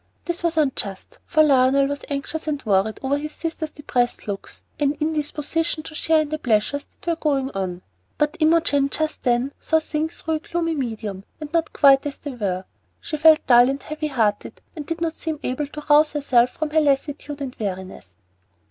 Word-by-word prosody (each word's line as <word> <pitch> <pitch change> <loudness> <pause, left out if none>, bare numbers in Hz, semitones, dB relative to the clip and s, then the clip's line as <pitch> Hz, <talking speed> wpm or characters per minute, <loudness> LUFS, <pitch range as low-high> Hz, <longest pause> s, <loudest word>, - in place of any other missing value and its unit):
This 345 0 -2
was 340 -1 0
unjust, 265 - -1
for 310 -2 +4
Lionel 275 -1 +4
was 285 0 -3
anxious 290 +3 -4
and 290 -3 -2
worried 205 +1 +1
over 280 +2 +1
his 305 +1 -6
sister's 320 -1 -4
depressed 245 -6 -1
looks 200 -1 -6 0.2
and 290 0 +1
indisposition 310 +1 -1
to 315 - -9
share 315 +1 +2
in 305 - -3
the 310 0 -3
pleasures 245 +3 0
that - - -24
were 340 -1 +1
going 280 -4 0
on; 185 -2 -4 0.3
but 300 +2 +1
Imogen 310 -3 +3
just 310 +2 -2
then 245 +2 +1
saw 320 - +2
things 315 +1 -3
through 320 - -2
a 310 - 0
gloomy 330 +1 -2
medium, 220 -8 -4 0.2
and 305 0 -8
not 330 -1 +1
quite 275 -2 +5
as 285 - -5
they 290 - -6
were. 195 -6 -3 0.3
She 310 - -4
felt 315 +1 +5
dull 245 0 +6
and 275 0 -3
heavy 305 0 -4
hearted, 225 -7 -1 0.2
and 300 -3 -7
did 330 0 -4
not 330 -1 0
seem 315 -2 -4
able 270 +3 -2
to 300 +1 -8
rouse 300 +1 +5
herself 255 -5 +3
from 310 +3 -4
her 315 0 +4
lassitude 290 0 -1
and 270 -3 -5
weariness. 185 - -6
290 Hz, 190 wpm, -23 LUFS, 250-310 Hz, 0.3 s, dull